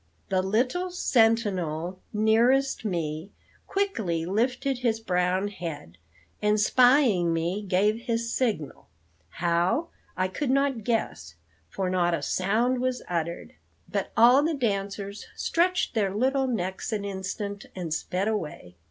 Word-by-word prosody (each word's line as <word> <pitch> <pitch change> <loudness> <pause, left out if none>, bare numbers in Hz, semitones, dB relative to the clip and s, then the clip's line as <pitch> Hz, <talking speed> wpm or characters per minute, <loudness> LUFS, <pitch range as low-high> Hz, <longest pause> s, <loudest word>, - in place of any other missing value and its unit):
The 185 -1 +2
little 250 - 0
sentinel 195 - +1
nearest 235 +6 +3
me 165 -3 -3 0.4
quickly 215 - -1
lifted 250 +7 0
his 230 -3 0
brown 185 -1 0
head, 150 - -7 0.4
and 210 0 +2
spying 245 - +4
me 170 +5 -1
gave 205 +2 +2
his 230 0 -1
signal 210 - -2 0.4
how, 175 - 0 0.3
I 185 0 +1
could 250 +9 -3
not 270 -3 +1
guess, 85 - -2 0.3
for 190 - -2
not 175 -2 +2
a 150 - -5
sound 225 - +1
was 255 -1 -1
uttered; 170 - -3 0.3
but 200 -2 -3
all 245 +4 +7
the 315 +1 0
dancers 200 -4 -3
stretched 360 +2 +1
their 210 -4 +1
little 265 +6 +1
necks 190 -4 -3
an 205 -2 -2
instant 200 +1 -5
and 175 -4 -3
sped 185 +4 -2
away. 150 - -4
205 Hz, 125 wpm, -26 LUFS, 180-245 Hz, 0.4 s, all